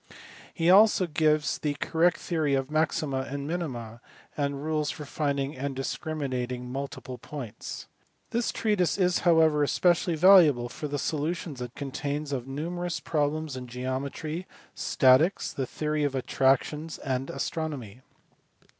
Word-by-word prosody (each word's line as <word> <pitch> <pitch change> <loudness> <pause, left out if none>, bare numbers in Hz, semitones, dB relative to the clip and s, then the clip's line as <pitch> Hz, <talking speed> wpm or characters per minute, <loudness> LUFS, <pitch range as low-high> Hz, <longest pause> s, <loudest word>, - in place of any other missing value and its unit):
J - - -18
a - - -17
He 165 0 +2
also 200 -1 +6
gave 155 -2 +2 0.2
the 145 -1 -1
correct 165 +4 +2
theory 155 -5 0
of 135 +1 -2
maxima 155 -3 0
and 140 +1 -4
minima, 120 -9 -4 0.3
and 140 -1 -2
rules 155 -1 0
for 150 - -6
finding 140 -1 -2
and 135 +1 -4
discriminating 130 -4 -3
multiple 135 -2 -6
points. 130 -5 -7 0.5
This 235 0 0
treatise 205 -6 +1
is 180 -2 +2
however 160 -3 +4
especially 175 +3 +2
valuable 155 -8 +6
for 150 - -5
the 145 0 -3
solu 155 +4 -1
tions 150 -7 -7
it 125 0 -6
contains 145 +1 -4
of 130 -2 -3
numerous 170 +5 -3
problems 155 -1 -1
in 125 -1 -6
geometry, 135 +7 -4 0.3
statics, 135 +8 +3
the 135 -2 -3
theory 150 +2 -1
of 140 -2 0
attractions, 135 +4 +1
and 130 -1 -3
astronomy. 135 -6 -4
145 Hz, 140 wpm, -27 LUFS, 135-160 Hz, 0.5 s, also